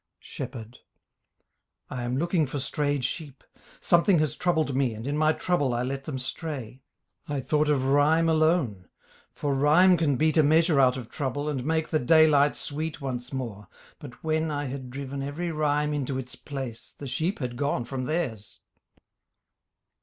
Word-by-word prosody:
SHEPHERD 115 0 -8 1.1
I 125 - -4
am 120 +1 -2
looking 170 0 +1
for 140 - -4
strayed 145 -1 -1
sheep; 140 -1 -5 0.4
Something 170 +2 +4
has 155 -2 0
troubled 160 -6 0
me 130 -4 +1
and 110 +2 -8
in 140 +1 -1
my 155 +1 +3
trouble 145 -7 0
I 120 - 0
let 135 +1 -4
them 145 -4 -4
stray. 130 -2 -6 0.5
I 145 -2 -2
thought 150 +3 +1
of 135 -3 +2
rhyme 145 +4 +4
alone, 155 - +1 0.4
For 145 -1 -2
rhyme 155 +7 +5
can 150 -4 +1
beat 155 +4 +2
a - - +7
measure 160 0 +4
out 130 -1 +4
of 120 -2 -8
trouble 145 +1 -3
And 140 -4 -2
make 160 +2 0
the 155 - +1
daylight 150 +1 +5
sweet 150 0 -3
once 125 -3 -5
more; 115 -7 -5 0.3
but 135 -4 -12
when 160 0 0
I 145 -1 -2
had 130 -1 -6
driven 140 +1 -5
every 155 +5 -3
rhyme 150 -1 0
into 140 -2 -2
its 125 -1 -6
place 135 -5 -7
The 145 - -8
sheep 155 +9 -1
had 125 -3 -4
gone 140 -2 -1
from 130 +1 -4
theirs. 125 -10 -3
145 Hz, 170 wpm, -27 LUFS, 130-155 Hz, 1.1 s, a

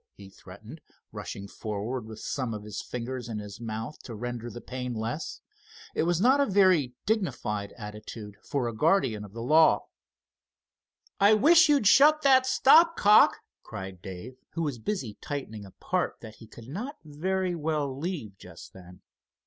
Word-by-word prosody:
he 100 -1 -13
threatened, 105 - -13 0.3
rushing 100 - -7
forward 110 +3 -5
with 110 -1 -9
some 125 -5 -3
of 105 - -7
his 105 -1 -6
fingers 125 0 -6
in 110 - -4
his 105 -1 -8
mouth 115 +5 -6
to 115 - -9
render 120 +1 -5
the 120 - -8
pain 125 -1 -5
less. 115 +8 -4 0.5
It - - 0
was 175 -1 +1
not 260 +7 +4
a 280 - +3
very 185 - +3
dignified 130 - -2
attitude 105 -1 -9
for 135 -4 -2
a 115 - -4
guardian 125 - +1
of 105 -1 -12
the 115 0 -6
law. 155 +5 +4 1.3
"I 205 +2 +6
wish 320 +8 +6
you'd 285 -6 +3
shut 300 +8 +6
that 260 -2 +5
stop 315 +6 +5
cock!" 210 +1 +5 0.2
cried 95 -2 -8
Dave, 95 +8 -9 0.2
who 165 - -2
was 140 -6 -3
busy 130 - -4
tightening 110 -8 -6
a - - -15
part - - -2
that 110 -1 -11
he 115 - -14
could 115 +1 -13
not 230 - -6
very 185 +5 -2
well 150 -4 -2
leave 140 - -5
just - - -13
then. 90 -1 -14
125 Hz, 165 wpm, -27 LUFS, -, 1.3 s, I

